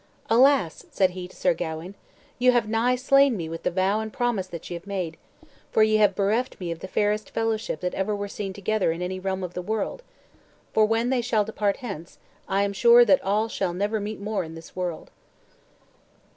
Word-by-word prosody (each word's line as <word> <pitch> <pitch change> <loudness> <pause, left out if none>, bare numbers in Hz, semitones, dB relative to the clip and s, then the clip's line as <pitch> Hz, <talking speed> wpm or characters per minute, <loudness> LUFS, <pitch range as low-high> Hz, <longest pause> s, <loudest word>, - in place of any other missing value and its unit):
"Alas!" 250 - +3
said 190 -2 +2
he 180 0 -7
to - - -18
Sir 180 - +2
Gawain, 165 +2 -5 0.5
"you 250 0 +5
have 235 -3 +2
nigh 230 +3 +2
slain 275 -1 +4
me 165 -3 -4
with 165 +1 -6
the - - 0
vow 190 +4 +1
and 220 0 -4
promise 235 -6 -1
that 170 -3 -8
ye - - -6
have 170 +3 -8
made, 185 -5 -3 0.6
for 220 - +4
ye 215 0 +4
have 205 -3 +4
bereft 215 +6 0
me 175 -3 -4
of 165 - -5
the 190 - -7
fairest 210 +2 0
fellowship 225 -2 -2
that 180 0 -2
ever 195 +2 -1
were 205 0 -4
seen 200 -1 -5
together 200 -1 0
in 170 +2 -4
any 185 +1 -3
realm 190 0 -2
of 180 -1 -5
the 180 - -4
world; 220 - -3 0.7
for 215 -1 +4
when 230 +3 +1
they 255 -2 +2
shall 225 -3 +1
depart 205 -2 -1
hence, 175 -6 -7 0.3
I 195 +1 +2
am 200 0 -1
sure 235 +4 +7
that 195 -4 +4
all 210 +3 +1
shall 190 -5 -2
never 205 +3 0
meet 210 +1 -5
more 200 -1 -2
in 160 0 -9
this 165 0 -12
world." 180 -3 -4
200 Hz, 215 wpm, -25 LUFS, 180-220 Hz, 0.7 s, sure